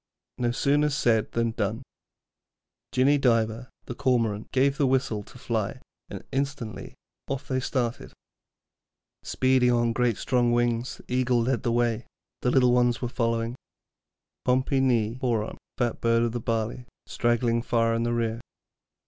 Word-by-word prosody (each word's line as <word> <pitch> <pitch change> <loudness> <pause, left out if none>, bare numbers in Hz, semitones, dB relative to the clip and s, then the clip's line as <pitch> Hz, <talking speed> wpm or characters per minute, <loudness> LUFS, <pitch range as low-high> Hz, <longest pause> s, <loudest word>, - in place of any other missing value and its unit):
No 120 -1 +1
sooner 145 +4 +2
said 120 -6 +1
than 115 0 +1
done. 110 +2 -2 1.1
Jinny 140 +3 +3
Diver, 115 -1 +1 0.2
the - - -5
Cormorant, 115 -4 0
gave 135 +2 +2
the 140 - +3
whistle 130 -5 0
to - - -14
fly, - - -2 0.3
and - - -7
instantly 135 -5 -4 0.3
off 135 +1 -4
they 130 -2 0
started. 125 -2 -2 1.1
Speeding 130 -1 +2
on 120 -1 +2
great 120 -1 +1
strong 120 -2 +1
wings, 120 +3 0
the - - -6
eagle 125 -2 +2
led 130 +1 0
the 120 - 0
way, 120 -1 0 0.3
the 125 - +1
little 125 -1 +4
ones 120 -1 +3
following, 115 -1 -1 0.9
Pompee 130 +2 +2
ny 120 -2 +1
Hoarn, 115 -4 -1 0.2
Fat 120 -2 -1
bird 115 0 +3
of 120 - 0
the 120 - -3
barley, 115 +2 -2 0.2
straggling 120 0 +1
far 115 -1 +1
in 115 - 0
the 120 0 0
rear. 115 0 -1
120 Hz, 145 wpm, -26 LUFS, 115-130 Hz, 1.1 s, little